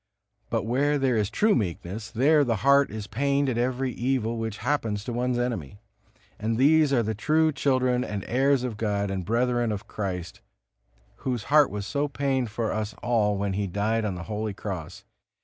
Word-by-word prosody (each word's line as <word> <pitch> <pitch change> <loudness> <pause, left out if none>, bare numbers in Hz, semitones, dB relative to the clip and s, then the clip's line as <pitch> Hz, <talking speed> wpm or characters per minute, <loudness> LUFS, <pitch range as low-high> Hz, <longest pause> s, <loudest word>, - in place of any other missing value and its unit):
But 115 -3 0
where 140 +5 +1
there 135 -3 +1
is 105 -2 +1
true 215 - +3
meekness, 100 +1 -3
there 145 +7 +4
the 120 -4 +1
heart 140 0 +5
is 110 -2 -6
pained 140 +6 0
at 120 - -1
every 130 +1 0
evil 120 -2 -1
which 110 -2 -3
happens 110 -8 0
to 120 - -4
one's 125 +1 0
enemy. 115 - -3 0.6
And 110 +1 -1
these 150 +3 +4
are 125 -4 +3
the 110 +1 -1
true 155 +9 +2
children 130 -3 +1
and 105 -5 -4
heirs 135 +1 +2
of 120 -4 -3
God 100 -2 -1
and 95 -1 -3
brethren 120 +3 +1
of 105 -1 -5
Christ, 90 -4 -5 0.8
Whose 125 -5 -3
heart 150 -2 +7
was 105 -1 -5
so 145 +6 -1
pained 135 -3 -1
for 110 +1 -2
us 110 -1 -3
all 110 -4 +2
when 100 0 -1
He 100 +1 -1
died 105 +4 0
on 100 -3 -2
the 85 - -6
holy 105 0 -4
Cross. 90 -4 -6
115 Hz, 185 wpm, -26 LUFS, 105-130 Hz, 0.8 s, heart